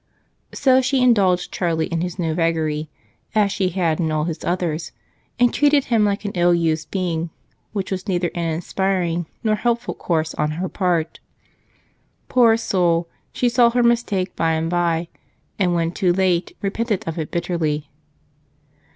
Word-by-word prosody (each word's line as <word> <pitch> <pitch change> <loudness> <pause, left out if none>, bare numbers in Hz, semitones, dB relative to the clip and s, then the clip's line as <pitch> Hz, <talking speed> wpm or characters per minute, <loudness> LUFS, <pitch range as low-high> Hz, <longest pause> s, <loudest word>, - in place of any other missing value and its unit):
So 260 -1 +3
she 260 0 +1
indulged 195 -7 +3
Charlie 165 -3 0
in 165 -1 -2
his 180 0 -4
new 165 -3 -1
vagary, 160 -2 0 0.5
as 205 -2 +3
she 190 -2 0
had 170 -3 0
in 160 -2 0
all 155 -1 0
his 165 0 -4
others, 170 -3 -2 0.4
and 245 0 +3
treated 290 -1 +4
him 230 -3 +2
like 205 0 -1
an 200 - -2
ill 175 -1 +3
used 160 -2 0
being, 170 -3 -2 0.4
which 200 -3 -4
was 190 +1 -3
neither 175 -2 0
an 170 -1 -2
inspiring 175 0 -1 0.2
nor 215 -2 +2
helpful 235 +2 -1
course 160 -2 -1
on 150 - -1
her 185 +2 -2
part. 175 -5 -1 1.1
Poor 235 -3 +5
soul! 175 -6 +1 0.2
She 250 - 0
saw 240 0 +4
her 245 +1 +1
mistake 230 -6 +1
by 165 -1 +1
and 160 +1 -1
by, 170 -1 +1 0.5
and 180 -3 +2
when 165 -1 0
too 180 0 +1
late 180 -1 0
repented 210 0 -1
of 165 0 -3
it 155 - -3
bitterly. 165 -4 -2
175 Hz, 160 wpm, -21 LUFS, 165-205 Hz, 1.1 s, Poor